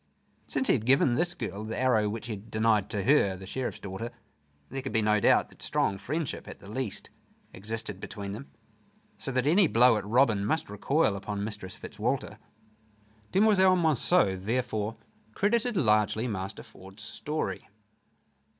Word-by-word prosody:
Since 265 - -1
he - - +5
had 115 -2 -1
given 135 -1 +4
this 175 +6 0
girl 105 -2 -5
the 110 +1 -4
arrow 120 -5 +2
which 110 +2 -5
he 115 - -4
had 105 +2 -10
denied 110 -2 +2
to 100 -2 -2
her, 105 -8 +3
the 95 - -10
Sheriff's 130 +6 -4
daughter, 100 +4 -6 0.6
there 135 +1 -4
could 135 - -5
be 110 -2 +2
no 105 0 +3
doubt - - +4
that - - -20
strong 100 -1 0
friendship, 150 +7 -3
at - - -8
the - - -14
least, 120 0 -4 0.4
existed 105 0 -5
between 100 0 -6
them, 115 +8 -8 0.7
so 135 - -3
that 130 0 0
any 175 +5 +5
blow 120 -3 +5
at 105 - -4
Robin 115 -3 +3
must 155 +4 -1
recoil 110 +2 +1
upon 100 +1 -4
Mistress 105 -3 -6
Fitzwalter. 105 -1 -3 0.9
Demoiselle 190 -2 +5
Monceux 160 - +3
therefore 115 -1 -1 0.4
credited 230 +2 +1
largely 110 -3 +2
Master 100 -2 -5
Ford's 95 +3 -13
story. 150 +7 -4
115 Hz, 160 wpm, -28 LUFS, 105-135 Hz, 0.9 s, he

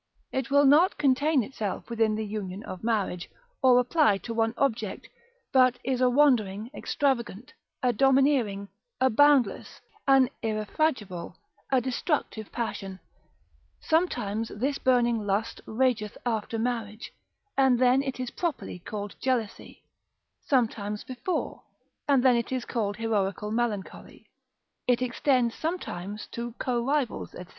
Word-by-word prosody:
It 265 -2 -2
will 285 +1 +5
not 305 +7 +5
contain 280 0 +3
itself 210 -4 -5
within 225 -2 +1
the 220 0 -3
union 205 -1 -5
of 185 -2 -8
marriage, 210 -6 -1 0.3
or 255 -1 +6
apply 250 -4 +3
to 230 - -4
one 225 0 0
object, 225 -7 -1 0.5
but 255 -2 +5
is 260 0 -1
a 255 - +5
wandering, 240 -6 +2
extravagant, 250 -7 -2 0.3
a 250 -1 +3
domineering, 260 -6 +2 0.3
a 260 0 +3
boundless, 290 +1 +3 0.3
an 270 -2 +5
irrefragable, 215 - -2 0.3
a 265 - +4
destructive 250 - -2
passion: 195 -5 -4 0.8
sometimes 225 - 0
this 275 +6 -2
burning 240 -2 +2
lust 210 +2 -2
rageth 220 -3 0
after 225 -1 -1
marriage, 225 -2 -3 0.4
and 265 -2 +4
then 255 +2 +4
it 265 -2 -4
is 255 -1 -3
properly 330 - -4
called 205 +2 -6
jealousy; 245 -5 -2 0.6
sometimes 215 -5 -1
before, 255 +8 -4 0.5
and 275 -3 +4
then 255 -2 +5
it 235 +1 -1
is 255 -2 -2
called 205 -4 -2
heroical 210 -2 -1
melancholy; 220 -4 -3 0.6
it 245 -1 +3
extends 250 -1 +1
sometimes 210 - -4
to 235 0 -5
co 240 -1 -1
rivals, 275 -1 -1
&c. 180 - -8
240 Hz, 130 wpm, -27 LUFS, 215-265 Hz, 0.8 s, or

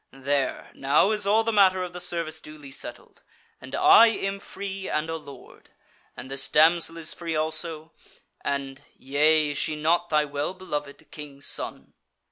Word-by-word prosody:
There, 135 0 -2
now 145 +9 +2
is 210 -2 0
all 220 +2 +4
the 230 - 0
matter 190 -3 +4
of 180 -1 -7
the 180 - -6
service 170 -3 -3
duly 150 -2 -12
settled, - - -8 0.4
and - - -7
I 365 -10 +7
am 200 -3 -2
free 195 0 -6
and 155 +2 -1
a - - -2
Lord. 145 -3 -12 0.5
And 130 - -9
this 135 0 0
damsel 165 +2 +3
is 165 -1 -3
free 165 -2 -4
also, 155 0 -2 0.5
and 140 0 -3
yea, 150 +2 +2
is 145 - -3
she 155 - -1
not 170 +3 +1
thy 150 -1 +2
well 145 +5 -3
beloved, 150 -6 -6
King's 145 -2 -8
Son?" - - -4
155 Hz, 165 wpm, -25 LUFS, 145-185 Hz, 0.5 s, I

